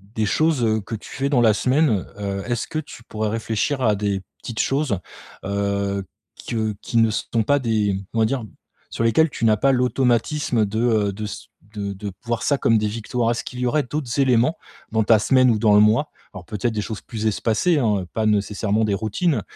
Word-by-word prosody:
des 110 - +1
choses, 155 +1 +2
heu, 110 -1 +2
que 115 +3 -6
tu 105 - -10
fais 135 +1 -2
dans 135 -4 +3
la 110 -2 +5
semaine, 125 - +2
heu. 100 -1 -3
Est-ce 120 -1 -2
que 155 - -2
tu 145 -6 -10
pourrais 110 -1 -3
réfléchir 115 +5 -1
à 110 -4 +3
des 100 -1 -1 0.2
petites 115 -2 -6
choses, 135 -9 0 0.5
heu, 100 0 -1 0.3
qui, 120 - -6
heu, 110 -1 -1
qui 115 - -2
ne 115 -1 +5
sont 115 +1 -1
pas 145 +6 +3
des 110 -5 0 0.2
comment 115 -1 +3
dire, 120 0 -2 0.5
sur - - -2
lesquelles 115 +8 +4
tu - - -6
n'as 110 -1 +4
pas 135 +6 +3
l'automatisme 125 -1 +1
de, 105 +2 -3
heu, 110 -4 +2
de 105 +2 -5
ce 105 - -7 0.3
de 100 -1 -3
de 100 +1 -6
voir 120 -1 -2
ça 140 - +2
comme 115 - +3
des 105 0 0
victoires? 115 +2 -1
Est-ce 115 - -2
qu'il 125 - -8
y 125 - 0
aurait 150 +5 +2
d'autres 135 -1 -3
éléments, 130 +3 +3 0.3
dans 110 0 +2
ta 110 +1 +5
semaine 130 +3 +4
ou 110 - +1
dans 105 -1 +4
le - - +7
mois, 110 +8 +3 0.2
alors 95 -3 -9
peut-être 105 +6 -2
des 105 - -1
choses 110 0 -6
plus 110 -2 -6
espacées, 115 - +1
hein, 105 -6 +1
heu, 90 - -6
pas 110 - 0
nécessairement 105 +1 +1
des 105 - 0
routines, 110 - 0
110 Hz, 220 wpm, -22 LUFS, 105-125 Hz, 0.5 s, le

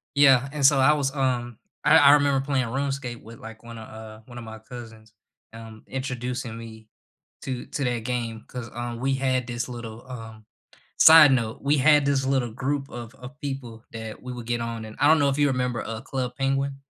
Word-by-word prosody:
Yeah, 135 -2 +5
and 145 -2 0
so 140 -1 +6
I 135 +3 +5
was, 140 -1 -1
um 120 -4 -1 0.3
I 160 - +7
I 145 -3 +7
remember 140 -2 +3
playing 135 -3 0
RuneScape 135 -1 -3
with, 115 +1 -12
like, 115 0 -11
one 115 0 -10
a, 110 - -8
uh 110 0 -11
one 120 0 -12
of 120 - -7
my 110 0 -9
cousins, 110 -1 -12 0.4
um, 115 -1 -11
introducing 125 -3 -4
me 110 -1 -11 0.6
to 130 -2 -4
to 140 - -4
that 120 -1 0
game 115 -3 -3
'cause, 125 -2 -7
uh, 120 0 -5
we 135 +2 0
had 130 -2 0
this 120 +1 -4
little, 115 -1 -8
um 110 -3 -9 0.5
side 160 -3 +9
note, 115 -3 -1
we 145 +2 +2
had 150 +1 +5
this 140 -1 +1
little 130 -3 0
group 135 +3 -3
of 120 0 -9
of 130 +3 -12
people 135 -6 -6
that 110 -1 -8
we 125 0 -7
would 120 -2 -8
get 120 0 -1
on 115 -1 -4
and 110 - -10
I 145 - +4
don't 160 0 +5
know 140 - +3
if 135 - -1
you 145 -1 +3
remember, 125 -3 -1
uh, 115 0 -5
Club 130 -2 -4
Penguin? 135 0 -1
125 Hz, 210 wpm, -25 LUFS, 115-135 Hz, 0.6 s, side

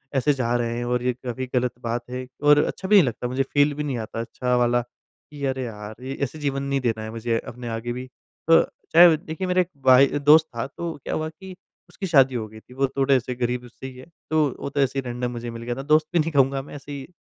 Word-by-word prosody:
ऐसे 135 +2 +3
जा 120 -3 -1
रहे 120 -1 -1
हैं 120 - -3
और 125 0 -1
ये 125 - +1
काफ़ी 125 +1 -5
गलत 125 0 +1
बात 120 +1 -2
है 125 +1 -5 0.2
और 145 0 +6
अच्छा 190 - -4
भी 210 - +5
नहीं 195 - +8
लगता 125 +1 -3
मुझे 130 +2 0
फील 145 0 +3
भी 150 - -4
नहीं 140 -4 -2
आता 115 - -7
अच्छा 125 +2 -2
वाला। 120 0 +2
कि 140 +4 -15
अरे 130 -1 -1
यार, 105 -2 -7
ये 135 - -4
ऐसे 140 +4 -4
जीवन 140 -2 -2
नहीं 140 0 0
देना 115 -3 -1
है 110 - -6
मुझे 115 0 -1
अपने 120 0 -8
आगे 115 +1 -3
भी। 125 +1 -6 0.4
तो 165 - +8 0.3
चाहे 170 0 +8
देखिए 160 +5 -5
मेरा 180 0 +3
एक 175 - -4 0.2
भाई 130 +1 +7
दोस्त 155 +2 +6
था 115 - -2
तो 170 +3 -5
क्या - - -4
हुआ 155 0 -2
कि 190 +4 -12 0.4
उसकी 190 +2 -5
शादी 135 -6 +4
हो 110 -2 -3
गई 110 +1 -13
थी, 125 - -18
वो 135 +1 +1
थोड़े 135 0 +4
ऐसे 125 0 -1
गरीब 125 0 -2
उससे 125 +2 -10
ही 130 -1 -11
है। 130 - -11 0.2
तो 155 -2 +3
वो - - -4
तो 145 +1 -3
ऐसे 135 0 +1
ही - - -3
रैंडम 125 0 -3
मुझे 120 0 -5
मिल 115 0 -8
गया 120 0 -3
था, 135 - -5
दोस्त 155 +2 +3
भी 175 - +3
नहीं 160 +1 0
कहूँगा 135 -1 +2
मैं 140 - -11
ऐसे 145 0 -10
ही 140 -2 -6
130 Hz, 265 wpm, -24 LUFS, 120-145 Hz, 0.4 s, नहीं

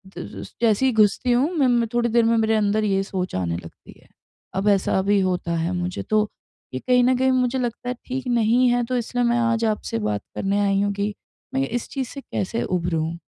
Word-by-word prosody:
तो - - -5 0.2
ज - - -8 0.2
जैसे 230 +2 +3
ही 260 - +4
घुसती 215 +3 +3
हूँ 260 +7 +2
मैं 275 -4 +4
म 240 -1 +3
थोड़ी 240 0 +1
देर 235 0 +3
में 230 0 +3
मेरे 220 0 +2
अंदर 215 0 +1
ये 195 -2 +1
सोच 185 - -4
आने 85 -2 -1
लगती 85 -1 -12
है, - - -23 0.5
अब 195 +2 +1
ऐसा 195 -1 +2
भी 200 +1 +3
होता 180 -2 -1
है 170 +2 -1
मुझे। 180 0 -3
तो 215 -1 +1 0.4
ये 130 - -2
कहीं 250 - +3
न 255 0 +3
कहीं 260 0 +3
मुझे 255 0 +1
लगता 245 0 -3
है 250 - -2
ठीक 260 0 -4
नहीं 240 +1 +3
है 245 0 +2
तो 250 +1 -1
इसलिए 245 +1 -1
मैं 240 0 +2
आज 230 -1 +1
आपसे 210 - -1
बात 105 -1 -1
करने 200 +1 0
आई 200 0 +2
हूँ 200 0 0
कि 205 +1 -2 0.4
मैं 270 +1 0
इस 240 0 -3
चीज़ 265 -3 -3
से 275 - -8
कैसे 230 -1 -3
उभरूँ? 170 -2 -1
220 Hz, 230 wpm, -23 LUFS, 195-245 Hz, 0.5 s, ही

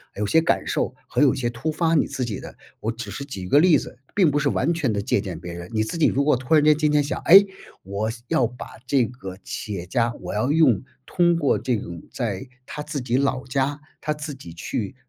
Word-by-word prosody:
有 105 - -1
些 160 +10 +4
感 165 - +1
受， - - -1
和 - - 0
有 140 -2 +5
些 120 -3 -1
突 120 +7 -3
发 165 +1 +1
你 150 - +3
自 130 - -3
己 105 -4 -4
的， - - -10 0.2
我 115 - -2
只 115 -3 -7
是 140 - -5
举 115 -9 -7
一 - - -6
个 145 - +6
例 170 -1 +6
子， 125 - -8 0.2
并 180 -7 +4
不 145 - +1
是 140 -1 +1
完 160 +7 +1
全 145 -8 0
地 100 - -1
借 100 - +1
鉴 95 -5 -6
别 85 0 -7
人。 85 +1 -8
你 110 - +2
自 110 +10 -4
己 160 - +4
如 140 +2 +1
果 150 -2 +4
突 130 +5 -2
然 150 - +5
间 150 0 +6
今 150 -1 +2
天 150 -1 +3
想， 145 - -3
诶， 195 +3 +9 0.4
我 100 +3 -2
想 120 +1 -8
要 120 -3 +3
把 125 -1 -9 0.2
这 130 -4 +3
个 95 -7 -8
企 105 - -5
业 90 -2 -5
家 120 +4 0
我 - - -5
要 110 +6 0
用 150 -9 +4 0.2
通 175 -1 +2
过 150 -4 +2
这 125 - 0
种 85 -6 -6
在 115 0 -3 0.2
他 150 - -6
自 150 -1 -4
己 125 0 0
老 135 -1 0
家， 135 +2 -1 0.2
他 150 - -1
自 150 0 -6
己 110 -11 -11
去 105 +8 -4
130 Hz, 275 characters per minute, -23 LUFS, 110-150 Hz, 0.4 s, 诶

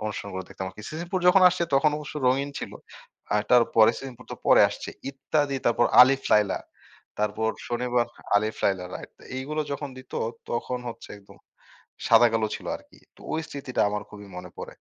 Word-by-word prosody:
অনুষ্ঠান 105 -1 -5
গুলো 95 - -3
দেখতাম। 95 - -6 0.2
সিসিমপুর 175 +4 -3
যখন 185 +1 +6
আসছে 175 -1 -1
তখন 140 +3 +4
অবশ্য 150 0 -8
রঙিন 140 +2 +1
ছিল। - - -6 0.6
আর 105 - +2
তারপরে 115 -2 +6
"সিসিমপুর" 125 -2 -9
তো - - -6
পরে - - +7
আসছে - - -7 0.2
"ইত্যাদি" 140 +1 -1
তারপর 120 0 +3 0.2
আলিফ 135 +2 +3
লায়লা। 105 -2 +3 0.6
তারপর 105 +1 0 0.2
শনিবার 120 0 0 0.3
"আলিফ 110 +2 0
লায়লা" 95 -2 +1
রাইট, - - -8
তো - - -19
এইগুলো 150 +4 -3
যখন 140 +1 -4
দিত 130 - -14 0.4
তখন 125 +1 -2
হচ্ছে 115 - -9
একদম 100 - -18 0.7
সাদা-কালো 115 -1 +5
ছিল - - -12
আরকি - - -21 0.2
তো - - -21
ওই 160 - 0
স্মৃতিটা 135 -3 -4
আমার 105 0 -3
খুবই 105 -1 -11
মনে 90 0 -8
পড়ে। - - -7
120 Hz, 170 wpm, -26 LUFS, 105-140 Hz, 0.7 s, পরে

